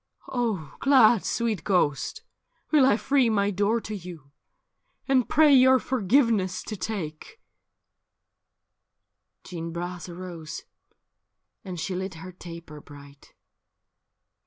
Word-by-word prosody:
' - - -54
' - - -27
Oh 220 - -2
glad, 245 -6 +5
sweet 225 -6 -2
ghost, 180 - 0 0.5
will 290 -4 +5
I 210 - +4
free 265 -1 +2
my 205 -2 +1
door 205 +4 +1
to 215 - -6
you, 170 -7 -10 0.8
And 260 -3 +2
pray 305 -1 +5
your 260 0 +6
forgiveness 230 -6 +1
to 215 - -6
take 195 - -6 1.4
/' - - -57
Jeanne 165 -2 -6
Bras 175 +1 -6
arose, 170 -3 -8 1.0
and 185 -3 -7
she 185 - -3
lit 190 0 -4
her 185 +3 -9
taper 170 -4 -11
bright. 140 -1 -16
190 Hz, 120 wpm, -26 LUFS, 170-235 Hz, 1.4 s, your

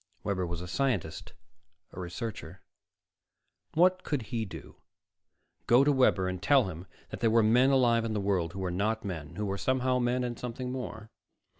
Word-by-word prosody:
Webber 95 -3 -1
was 85 0 -5
a 90 - -6
scientist, 100 - -2 0.6
a - - -9
researcher. 90 0 -6 1.1
What 180 +2 +4
could 145 -6 -2
he 115 -1 -1
do 95 - -10 0.9
go 120 +3 +6
to 145 - +4
Webber 125 -9 +3
and 95 -1 -4
tell 140 -2 +5
him 85 +1 -8 0.2
that - - -6
there 115 - +3
were 115 0 +4
men 120 +5 +5
alive 120 -4 +3
in 115 -1 -2
the 105 - -1
world 95 -4 0
who 95 - -5
were 90 -1 -2
not 110 +5 -1
men, 80 -7 -6
who 105 - -3
were 100 0 -3
somehow 130 -1 +1
men 125 +1 +1
and 120 -1 -4
something 125 +1 -5
more? 110 -4 -6
110 Hz, 180 wpm, -29 LUFS, 95-125 Hz, 1.1 s, go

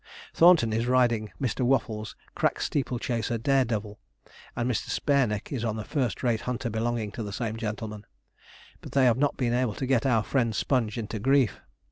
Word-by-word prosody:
Thornton 165 -10 +5
is 115 +2 0
riding 120 -4 +2
Mr. 130 -1 -2
Waffles' 110 -4 0 0.2
crack - - 0
steeple 130 -3 -1
chaser 115 -1 -2
'Dare 135 +3 +2
Devil,' 105 -2 -4 0.6
and 120 - -1
Mr. 125 -4 -2
Spareneck 125 -8 0
is 130 -5 -3
on 110 -2 -1
a 110 - -4
first 130 -2 -2
rate 115 -3 +1
hunter 125 -1 -3
belonging 110 -1 -2
to 115 - -6
the 105 -2 -5
same 110 +1 -3
gentleman, 110 -1 -5 0.7
but - - -10
they 135 -2 +4
have 120 -1 +4
not 145 0 +1
been 120 -2 0
able 120 -4 0
to 135 - -3
get 130 -1 +2
our 115 -4 +3
friend 115 -4 0
Sponge 120 -4 0
into 110 -1 -4
grief. 135 0 +2
120 Hz, 185 wpm, -27 LUFS, 110-130 Hz, 0.7 s, Thornton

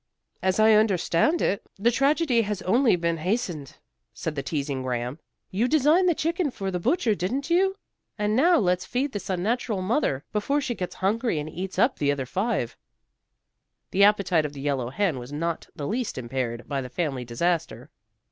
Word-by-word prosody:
"As 190 +2 +1
I 220 0 +6
understand 210 - +2
it, 200 +3 +1 0.2
the 225 +5 +3
tragedy 275 -1 +2
has 205 -3 -3
only 235 +3 +4
been 170 -1 -1
hastened," 175 - -3 0.4
said 160 - -3
the 140 - -3
teasing 140 -2 -3
Graham. 125 +2 -3 0.3
"You 215 +6 +1
designed 310 +6 +4
the 340 - +2
chicken 335 +1 0
for 195 -6 -4
the 180 - -2
butcher, 245 - +2
didn't 255 - -2
you? 385 +2 +3 0.4
And 210 0 0
now 335 +7 +5
let's 180 -4 +1
feed 260 +3 -1
this 205 -2 -6
unnatural 200 +2 -1
mother 185 - 0
before 245 +8 +1
she 275 -4 -2
gets 180 -5 -5
hungry 225 -1 +1
and 150 0 -3
eats 185 +3 -5
up 240 +7 +2
the 145 -1 +2
other 140 -2 -2
five." 190 - -1 1.2
The 200 - +4
appetite 200 -5 +4
of 150 -1 -4
the 140 - -8
yellow 135 -4 -1
hen 165 -1 0
was 125 +2 -9
not 165 +3 -3
the 150 -4 -5
least 235 - -2
impaired 120 -1 -3
by 140 -2 -2
the 125 - -7
family 135 -2 -2
disaster. 145 +1 -2
190 Hz, 180 wpm, -25 LUFS, 145-240 Hz, 1.2 s, I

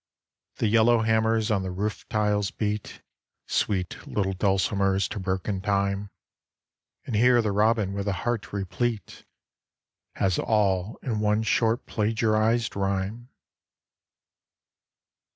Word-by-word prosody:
The - - -1
yellowhammers 110 0 +3
on 95 - -1
the 95 - -4
roof 100 +4 -4
tiles 105 -2 +1
beat 105 0 -4 0.4
Sweet 95 -4 -2
little 95 -2 -1
dulcimers 95 0 +1
to 105 - -5
broken 95 +1 -2
time, 100 0 0 1.0
And 120 - -3
here 120 +3 +5
the 105 - 0
robin 105 -1 +2
with 100 0 -3
a - - +2
heart 120 -3 -2
replete 100 +2 -3 0.9
Has 95 -3 +1
all 100 -2 +1
in 115 -5 -2
one 105 +1 +1
short 115 +2 +1
plagiarised 110 +1 +1
rhyme. 100 +5 -2
105 Hz, 110 wpm, -26 LUFS, 100-110 Hz, 1.0 s, here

